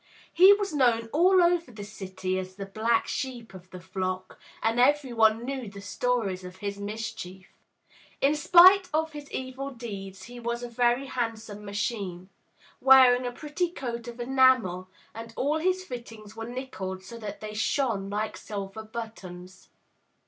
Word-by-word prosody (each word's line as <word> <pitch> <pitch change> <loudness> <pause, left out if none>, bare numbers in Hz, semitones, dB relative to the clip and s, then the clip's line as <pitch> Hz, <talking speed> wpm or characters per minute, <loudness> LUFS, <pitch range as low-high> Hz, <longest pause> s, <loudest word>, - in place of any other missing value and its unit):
He 370 +4 +8
was 405 -4 -2
known 235 -5 +2
all 360 +4 +5
over 345 -3 +2
the 210 -3 -8
city 190 -2 -4
as 185 0 -7
the 195 0 -6
black 220 +4 +1
sheep 240 -6 -5
of 185 -1 -13
the 185 - -9
flock, 185 0 -4 0.2
and 225 +2 +1
every 275 0 +3
one 225 0 +3
knew 260 -4 -4
the 200 0 -11
stories 200 -3 -1
of 180 0 -9
his 200 +1 -5
mischief. 200 -3 -6 0.7
In 275 +2 +3
spite 360 +4 +7
of 320 0 0
his 295 -2 -10
evil 260 +1 -5
deeds 200 -6 -8
he 240 +2 -10
was 235 +1 -3
a - - -3
very 240 +2 +1
handsome 225 -5 -4
machine, 200 -3 -4 0.5
wearing 255 -2 +6
a - - -3
pretty 305 +7 -2
coat 240 -7 -6
of 240 0 -8
enamel, 240 -8 +3 0.2
and 225 0 -9
all 300 +4 +1
his 370 +3 0
fittings 225 - -9
were 225 0 -6
nickeled, 190 -7 -6
so 230 +5 -10
that 210 -2 -7
they 215 0 -7
shone 220 -3 0
like 210 +2 -3
silver 200 0 -6
buttons. 200 -5 -9
230 Hz, 160 wpm, -27 LUFS, 200-260 Hz, 0.7 s, He